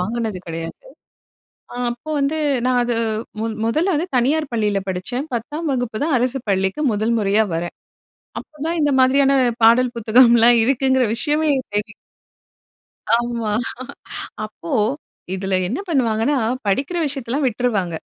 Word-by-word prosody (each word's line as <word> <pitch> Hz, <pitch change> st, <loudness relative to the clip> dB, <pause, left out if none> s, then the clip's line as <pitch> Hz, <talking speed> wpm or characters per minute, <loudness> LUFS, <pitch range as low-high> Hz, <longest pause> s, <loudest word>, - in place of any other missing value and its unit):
வாங்குனது 220 Hz, -1 st, -2 dB
கிடையாது. 165 Hz, 0 st, -5 dB, 1.0 s
அ -, -, -7 dB
அப்போ 240 Hz, +6 st, -8 dB
வந்து 285 Hz, +3 st, 0 dB, 0.3 s
நான் 250 Hz, -1 st, +2 dB
அது 240 Hz, 0 st, -1 dB, 0.5 s
முன் 225 Hz, 0 st, -2 dB
முதல்ல 325 Hz, +11 st, +1 dB
வந்து 340 Hz, +5 st, -2 dB
தனியார் 280 Hz, +5 st, +1 dB
பள்ளியில 210 Hz, -3 st, +1 dB
படிச்சேன். 245 Hz, +11 st, -3 dB
10ஆம் 295 Hz, +8 st, -3 dB
வகுப்பு 245 Hz, -3 st, -2 dB
தான் 315 Hz, -, +1 dB
அரசு 255 Hz, +2 st, -1 dB
பள்ளிக்கு 190 Hz, +9 st, 0 dB
முதல் 215 Hz, +3 st, 0 dB
முறையா 210 Hz, +1 st, +2 dB
வரேன். 170 Hz, +1 st, -3 dB, 0.7 s
அப்போ 305 Hz, -, -17 dB
தான் 335 Hz, +1 st, -1 dB
இந்த 290 Hz, -, +3 dB
மாதிரியான 275 Hz, +1 st, +4 dB, 0.3 s
பாடல் 245 Hz, +2 st, +5 dB
புத்தகம்லாம் 235 Hz, +1 st, +5 dB
இருக்குங்கிற 260 Hz, 0 st, +2 dB
விஷயமே 300 Hz, +4 st, +1 dB, 0.3 s
தெரியும். 210 Hz, +1 st, -2 dB, 1.2 s
ஆமா. 235 Hz, -2 st, -2 dB, 0.9 s
அப்போ 210 Hz, -5 st, -9 dB, 0.6 s
இதில 190 Hz, 0 st, -2 dB
என்ன 250 Hz, -, -3 dB
பண்ணுவாங்கன்னா, 250 Hz, -2 st, +1 dB, 0.3 s
படிக்கிற 275 Hz, -, 0 dB
விஷயத்தெல்லாம் 270 Hz, 0 st, -2 dB
விட்டுருவாங்க. 210 Hz, -7 st, -1 dB
240 Hz, 125 wpm, -20 LUFS, 215-275 Hz, 1.2 s, பாடல்